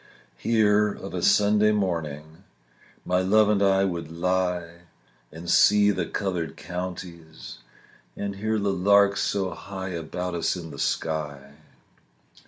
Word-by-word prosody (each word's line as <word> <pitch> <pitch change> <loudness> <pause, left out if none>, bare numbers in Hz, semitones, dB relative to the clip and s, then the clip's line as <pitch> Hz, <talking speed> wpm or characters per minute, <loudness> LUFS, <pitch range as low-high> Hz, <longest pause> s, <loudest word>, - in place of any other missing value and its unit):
Here 105 -2 +3
of - - -9
a - - -3
Sunday 105 +1 +4
morning 80 -4 -3 0.6
My 90 0 +1
love 105 +3 +4
and 105 -2 +2
I 95 0 +3
would 85 -4 -4
lie 85 0 -2 0.5
And 80 +2 -10
see 105 +3 +5
the 90 -4 -2
coloured 90 -6 -3
counties, 85 -4 -8 0.6
And 100 -1 -4
hear 110 +2 -1
the 100 -1 0
larks 100 +2 +3
so 95 -2 -1
high 95 -1 -7
About 90 +1 -4
us 85 +1 0
in 85 -3 -8
the 70 - -10
sky. 75 -3 -3
90 Hz, 130 wpm, -25 LUFS, 85-100 Hz, 0.6 s, see